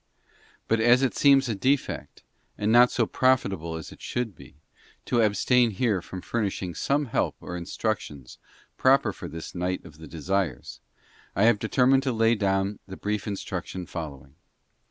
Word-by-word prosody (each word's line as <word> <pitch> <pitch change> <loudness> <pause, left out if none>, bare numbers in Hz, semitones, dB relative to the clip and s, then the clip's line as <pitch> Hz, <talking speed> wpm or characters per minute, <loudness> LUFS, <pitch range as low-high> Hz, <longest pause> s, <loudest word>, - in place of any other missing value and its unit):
But 115 - +2
as 120 +3 +5
it 130 - +1
seems 140 -2 +5
a 115 - -1
defect, 130 +8 -1 0.3
and 105 +1 0
not 120 +1 +7
so 120 - +1
profitable 100 -11 +1
as 80 - -7
it - - -14
should 120 -4 -3
be, - - -15 0.5
to 120 - +2
abstain 115 +3 +3
here 105 -2 0
from 90 +2 -8
furnish 105 -2 -2
ing 90 -2 -4
some 145 - 0
help 115 - -1
or 90 - -7
instructions 85 - -4 0.4
proper 135 +1 +3
for - - -8
this 80 +1 -8
night 90 +1 -3
of 75 - -14
the 80 - -10
desires, 85 -1 -3 0.6
I 100 - +2
have 115 -2 +5
determined 130 +4 +3
to 130 -2 -1
lay 115 0 +3
down 100 -1 0
the 95 - -8
brief 105 -1 -3
instruction 95 -2 -5
following. 70 -6 -8
105 Hz, 165 wpm, -26 LUFS, 90-120 Hz, 0.6 s, not